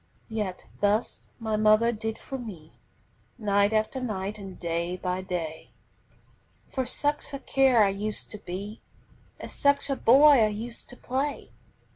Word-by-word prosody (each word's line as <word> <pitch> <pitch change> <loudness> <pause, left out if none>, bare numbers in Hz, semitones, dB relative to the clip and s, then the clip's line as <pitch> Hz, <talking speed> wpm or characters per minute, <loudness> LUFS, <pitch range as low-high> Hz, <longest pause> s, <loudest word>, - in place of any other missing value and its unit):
Yet 210 -5 -3
thus 205 +3 0
my 220 -2 -1
mother 215 +2 +4
did 220 0 -4
for 270 - -7
me, 180 -10 -10 0.6
Night 205 -2 +2
after 220 +4 0
night 210 -3 -3
and 195 -2 -9
day 170 +1 -2
by 180 0 -2
day, 170 -4 -5 1.0
For 260 -2 -2
such 290 +4 +1
a - - -2
care 265 -6 +4
I 200 - +4
used 205 +2 -3
to 210 - -6
be, 200 +4 -7 0.6
As - - -7
such 280 0 +2
a - - +1
boy 275 +2 +7
I - - +4
used 225 +3 -6
to 245 - -11
play. 275 +3 -3
215 Hz, 150 wpm, -27 LUFS, 195-245 Hz, 1.0 s, boy